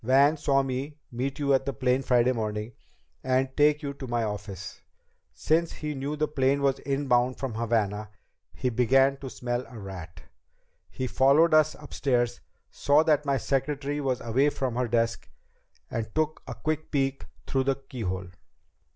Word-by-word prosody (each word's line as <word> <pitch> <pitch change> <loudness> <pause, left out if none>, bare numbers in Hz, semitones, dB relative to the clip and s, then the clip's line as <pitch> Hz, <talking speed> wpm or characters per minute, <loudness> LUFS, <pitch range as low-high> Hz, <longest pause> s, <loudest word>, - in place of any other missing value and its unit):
Van 140 +5 +5
saw 140 -2 +2
me 135 +3 -4
meet 130 +4 -3
you 140 -2 +2
at 135 -1 +3
the 140 - -1
plane 125 +2 +1
Friday 125 -1 +3
morning 110 -1 -3 0.5
and 130 0 +1
take 150 +1 +3
you 140 -1 -3
to 135 -1 -8
my 120 -1 0
office. 105 -3 -6 0.5
Since 165 +1 +1
he 150 -1 -4
knew 140 +2 -3
the 155 0 0
plane 140 -1 +1
was 135 -1 +2
inbound 130 -3 +1
from 135 -4 -3
Havana, 110 -2 -1 0.4
he 125 - -2
began 135 +4 +3
to 135 -1 -7
smell 120 0 -3
a 120 - -11
rat. 95 -5 -9 0.7
He 130 - -4
followed 140 +7 +4
us 155 0 +5
upstairs, 125 -5 -1 0.3
saw 145 +2 +3
that 150 -2 +2
my 140 -1 +2
secretary 145 +3 -1
was 130 -3 -1
away 130 +5 +2
from 130 -4 -3
her 125 0 0
desk, 115 0 0 0.6
and 110 -1 -3
took 155 0 0
a - - -5
quick 155 0 -3
peek 135 -2 -1 0.2
through 135 -1 0
the 135 0 +2
keyhole." 95 -9 -5
130 Hz, 165 wpm, -27 LUFS, 120-140 Hz, 0.7 s, Van